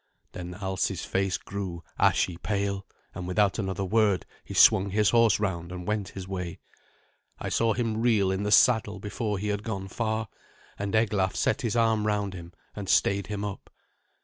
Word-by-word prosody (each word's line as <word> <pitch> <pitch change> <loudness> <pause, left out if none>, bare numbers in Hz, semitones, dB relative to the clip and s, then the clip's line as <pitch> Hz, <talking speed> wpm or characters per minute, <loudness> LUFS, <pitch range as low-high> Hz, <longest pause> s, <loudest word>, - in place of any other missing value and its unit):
Then 90 0 -7
Alsi's 95 -2 -2
face 95 0 0
grew 95 -4 -6 0.2
ashy 90 - +3
pale, 100 0 -2 0.3
and 90 - -6
without 100 +3 +2
another 95 -1 -2
word 105 -2 +2 0.2
he - - -8
swung 95 +1 +6
his 105 +1 +2
horse 115 -2 +4
round 90 -4 -2
and 90 -1 -6
went 105 -1 -1
his 95 -1 -6
way. 90 -3 -4 0.8
I - - -4
saw 115 -1 +2
him 115 -2 -1
reel 110 -5 +3
in 95 +1 -1
the 105 0 -1
saddle 110 -3 +4
before 105 0 -3
he 105 +2 -3
had 105 0 -1
gone 100 -3 -4
far, 110 +1 -2 0.5
and 100 +1 -2
Eglaf 105 -4 +1
set - - +1
his 115 -2 -1
arm 110 -2 +2
round 105 -2 0
him 85 -2 -9 0.2
and 100 -2 -6
stayed 100 -1 +2
him 105 -1 -3
up. 100 -2 -7
100 Hz, 175 wpm, -27 LUFS, 95-110 Hz, 0.8 s, swung